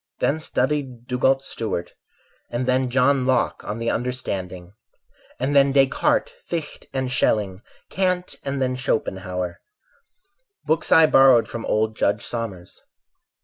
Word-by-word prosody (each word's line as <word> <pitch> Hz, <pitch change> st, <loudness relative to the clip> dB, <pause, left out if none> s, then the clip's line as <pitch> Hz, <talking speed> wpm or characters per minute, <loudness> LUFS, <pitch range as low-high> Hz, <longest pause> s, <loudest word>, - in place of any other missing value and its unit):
Then 155 Hz, -, 0 dB
studied 130 Hz, -4 st, -2 dB
Dugald 130 Hz, +2 st, +1 dB
Stewart; 110 Hz, -9 st, -4 dB, 0.6 s
And 120 Hz, +2 st, -2 dB
then 130 Hz, 0 st, +1 dB
John 135 Hz, +1 st, +3 dB
Locke 130 Hz, -2 st, +1 dB
on 105 Hz, -, -4 dB
the 115 Hz, 0 st, -1 dB
Understanding, 95 Hz, -8 st, -4 dB, 0.7 s
And 135 Hz, +3 st, 0 dB
then 140 Hz, 0 st, +5 dB
Descartes, 135 Hz, -, +2 dB, 0.2 s
Fichte 165 Hz, -3 st, -5 dB
and 130 Hz, -1 st, -2 dB
Schelling, 105 Hz, -6 st, +1 dB, 0.3 s
Kant 185 Hz, -1 st, 0 dB
and 135 Hz, 0 st, -3 dB
then 130 Hz, -1 st, 0 dB
Schopenhauer— 95 Hz, -8 st, -3 dB, 1.0 s
Books 160 Hz, +1 st, 0 dB
I 160 Hz, -, +8 dB
borrowed 135 Hz, -5 st, +6 dB
from 115 Hz, -, -6 dB
old 110 Hz, +1 st, 0 dB
Judge 105 Hz, -1 st, 0 dB
Somers. 100 Hz, -7 st, -6 dB
125 Hz, 125 wpm, -23 LUFS, 110-135 Hz, 1.0 s, I